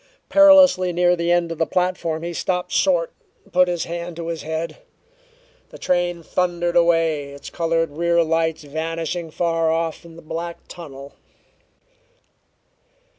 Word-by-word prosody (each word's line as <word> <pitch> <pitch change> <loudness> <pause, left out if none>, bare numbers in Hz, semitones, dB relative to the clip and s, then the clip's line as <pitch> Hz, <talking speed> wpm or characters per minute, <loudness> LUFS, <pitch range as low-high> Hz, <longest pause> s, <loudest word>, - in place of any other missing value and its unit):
Perilously 280 -11 +6
near 175 +1 +3
the 170 0 -1
end 175 -1 +1
of 165 - -6
the 165 - +2
platform 180 -3 -1
he 170 0 -4
stopped 180 +1 -2
short 175 -4 +2 0.3
and - - -26
put 180 0 +5
his 175 -2 -1
hand 170 0 -6
to 165 0 -5
his 165 -2 -4
head. 160 +2 -4 0.9
The - - -12
train 175 -1 -1
thundered 175 0 -1
away, 165 -4 +2
its 140 - -10
colored 165 -2 0
rear 170 +2 +2
lights 160 0 0
vanishing 165 +3 -4
far 165 0 0
off 165 0 -2
in 165 -1 -14
the 170 - -13
black 170 +2 -5
tunnel. 140 -5 -10
170 Hz, 145 wpm, -21 LUFS, 165-175 Hz, 0.9 s, Perilously